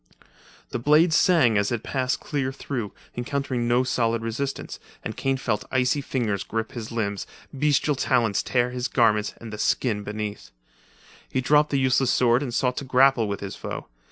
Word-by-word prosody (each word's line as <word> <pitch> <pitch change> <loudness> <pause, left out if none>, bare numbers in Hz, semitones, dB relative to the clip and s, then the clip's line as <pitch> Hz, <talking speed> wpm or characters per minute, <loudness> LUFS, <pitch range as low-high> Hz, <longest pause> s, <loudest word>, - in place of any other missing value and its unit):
The - - -2
blade 155 +6 +4
sang 150 - +4
as 100 +2 0
it 120 -2 -2
passed 130 -2 -1
clear 135 -3 -2
through, 125 -5 -4 0.2
encountering 125 -1 -2
no 120 +2 +3
solid 115 -3 0
resistance, 135 +5 -4 0.2
and - - -5
Kane 135 0 0
felt 115 -5 -1
icy 130 +2 +2
fingers 110 -8 -1
grip 110 0 -3
his 115 -2 -7
limbs, 100 -3 -2 0.3
bestial 145 +1 +2
talons 120 -6 +1
tear 125 -1 0
his 125 0 -2
garments 105 -3 +2
and 115 -2 -9
the 105 - -6
skin 105 0 +1
beneath, 105 0 -5 0.8
He - - -1
dropped 150 +3 +3
the 140 - +1
useless 130 -1 +2
sword 120 +1 +3
and 135 -4 -3
sought 125 +1 0
to - - -2
grapple 130 -3 +4
with 100 0 -4
his 100 -1 -5
foe. - - -6
125 Hz, 175 wpm, -25 LUFS, 115-135 Hz, 0.8 s, blade